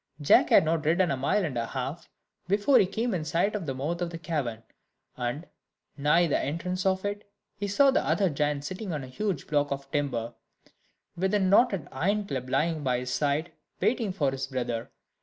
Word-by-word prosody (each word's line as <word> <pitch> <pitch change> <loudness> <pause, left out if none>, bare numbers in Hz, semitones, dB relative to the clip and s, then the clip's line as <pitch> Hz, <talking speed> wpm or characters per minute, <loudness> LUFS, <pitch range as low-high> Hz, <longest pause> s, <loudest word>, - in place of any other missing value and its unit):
Jack 145 - +5
had - - +6
not 160 0 0
ridden 170 +4 +2
a - - +1
mile 145 +9 +1
and 145 -6 -4
a 115 -1 -1
half 135 +6 -5 0.4
before 205 +8 +4
he 190 - +4
came 225 +4 -2
in 170 -4 -1
sight 170 +6 0
of 200 -7 -4
the 135 - -2
mouth 160 +7 -3
of 175 - -1
the 170 - -6
cavern; 145 -9 -3 0.5
and, 125 +6 -3 0.5
nigh 150 +4 +3
the 160 - +1
entrance 180 +6 -2
of 190 +1 0
it, 205 0 -4 0.2
he 205 - -3
saw 270 +8 +4
the - - +1
other 195 - +2
giant 145 -2 -1
sitting 185 +3 -5
on 145 -3 -3
a - - -8
huge 195 +8 -3
block 145 -1 +1
of 140 0 -5
timber, 120 -6 -1 0.8
with 190 +4 0
a - - +3
knotted 195 - +3
iron 200 +9 0
club 130 -7 -4
lying 160 +3 +1
by 125 -2 +1
his 125 +1 -4
side, 150 +3 0 0.3
waiting 230 -5 +1
for 145 -7 0
his 135 0 -4
brother. 120 -3 -3
160 Hz, 200 wpm, -28 LUFS, 140-190 Hz, 0.8 s, had